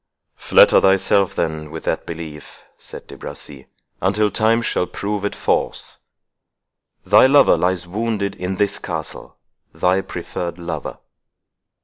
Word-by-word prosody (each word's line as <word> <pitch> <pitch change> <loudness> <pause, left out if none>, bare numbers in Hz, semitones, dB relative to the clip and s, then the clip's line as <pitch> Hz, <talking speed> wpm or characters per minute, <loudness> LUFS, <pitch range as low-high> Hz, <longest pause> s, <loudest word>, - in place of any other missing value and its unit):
"Flatter - - +5
thyself, 95 0 +3
then, 80 -2 -2
with 80 +1 -8
that - - -2
belief," 80 -3 -9 0.2
said - - -10
De - - -12
Bracy, 70 -2 -10 0.3
"until 105 +3 +1
time 115 +2 +2
shall 90 - -1
prove 100 0 -4
it 100 - -2
false. - - -1 1.1
Thy - - +6
lover 140 +1 +6
lies 90 0 0
wounded 105 +1 -2
in 90 0 -4
this 100 +1 0
castle—thy 90 +2 -4
preferred 85 -2 -6
lover. 85 -1 -6
95 Hz, 120 wpm, -20 LUFS, 85-105 Hz, 1.1 s, Thy